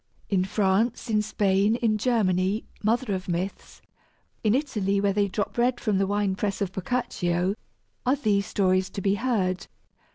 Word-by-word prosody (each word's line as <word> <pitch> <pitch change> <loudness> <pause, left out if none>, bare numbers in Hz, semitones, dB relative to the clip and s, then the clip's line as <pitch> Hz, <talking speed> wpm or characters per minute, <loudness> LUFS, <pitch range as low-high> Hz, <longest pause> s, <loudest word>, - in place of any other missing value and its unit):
In 185 -2 +3
France, 210 +4 +1
in 210 -1 +3
Spain, 205 0 +2
in 220 -3 +1
Germany 200 -3 +1 0.2
mother 225 +1 +1
of 185 -1 -4
myths 180 +2 -4 0.6
in 215 +1 +3
Italy, 210 -9 0
where 200 0 +2
they 205 0 +2
drop 205 +4 -3
red 245 +1 +2
from 205 -4 0
the 195 - +2
wine 205 -1 +1
press 200 0 -2
of 195 -2 -1
Boccaccio 190 -4 -1 0.5
are 255 +2 +3
these 205 -8 +1
stories 185 -1 +1
to 195 - -5
be 195 +1 +2
heard. 195 -5 -1
200 Hz, 160 wpm, -26 LUFS, 190-220 Hz, 0.6 s, In